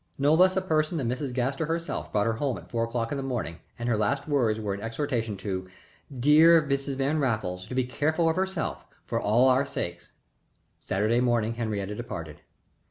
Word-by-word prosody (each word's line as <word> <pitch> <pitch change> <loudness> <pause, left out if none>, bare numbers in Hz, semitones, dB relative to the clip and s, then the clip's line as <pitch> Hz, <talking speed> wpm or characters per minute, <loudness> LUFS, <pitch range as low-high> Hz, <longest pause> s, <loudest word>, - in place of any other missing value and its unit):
No 145 +2 +3
less 185 +3 +5
a 190 - +1
person 155 -1 +1
than 135 -6 -1
Mrs. 125 +3 -2
Gaster 135 +5 -1
herself 165 +1 -3
brought 105 -1 +1
her 115 - +1
home 135 -4 0
at - - -13
four 115 -1 0
o'clock 115 0 -3
in 145 - -2
the - - -3
morning 120 -10 -3 0.2
and 120 - -4
her 120 - +2
last 135 +8 0
words 120 -7 +1
were 105 -2 -2
an 100 - -6
exhortation 115 -2 -2
to 95 -1 -4
her - - -19 0.5
"dear 155 +5 +7
Mrs. 140 -2 -2
Van 140 +3 0
Raffles" 105 -8 -1
to 125 - -6
be 130 - +2
careful 155 +6 0
of 160 - +2
herself 190 -3 -2 0.2
"for - - -2
all 115 +5 +4
our 130 +1 +4
sakes." 85 -10 -5 0.7
Saturday 110 +5 +1
morning 120 -2 +1
Henriette 105 -3 -3
departed. 85 -9 -7
125 Hz, 200 wpm, -27 LUFS, 110-145 Hz, 0.7 s, dear